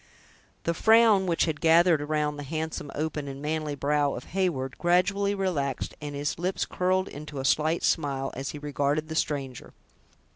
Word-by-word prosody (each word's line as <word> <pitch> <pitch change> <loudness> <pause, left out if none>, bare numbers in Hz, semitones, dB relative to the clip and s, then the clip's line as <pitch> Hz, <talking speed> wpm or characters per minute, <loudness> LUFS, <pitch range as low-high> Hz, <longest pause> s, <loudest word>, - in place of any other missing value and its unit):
The 170 - 0
frown 220 0 +5
which 170 -2 +2
had 160 -1 -3
gathered 165 -1 +5
around 150 0 -1
the - - -5
handsome, 155 0 -4
open, 150 -1 -3
and 135 0 -6
manly 150 0 -2
brow 145 0 +1
of 120 - -9
Heyward, 160 -9 -1
gradually 195 +3 +2
relaxed, 150 -9 -2
and 145 -1 -5
his 145 +3 -2
lips 185 +2 -1
curled 185 +1 0
into 150 0 -8
a 135 - -3
slight 155 +4 +2
smile, 135 -4 0
as 135 +3 -4
he - - -6
regarded 145 +1 -1
the 160 - -4
stranger. 140 -5 -3
155 Hz, 170 wpm, -27 LUFS, 145-175 Hz, -, frown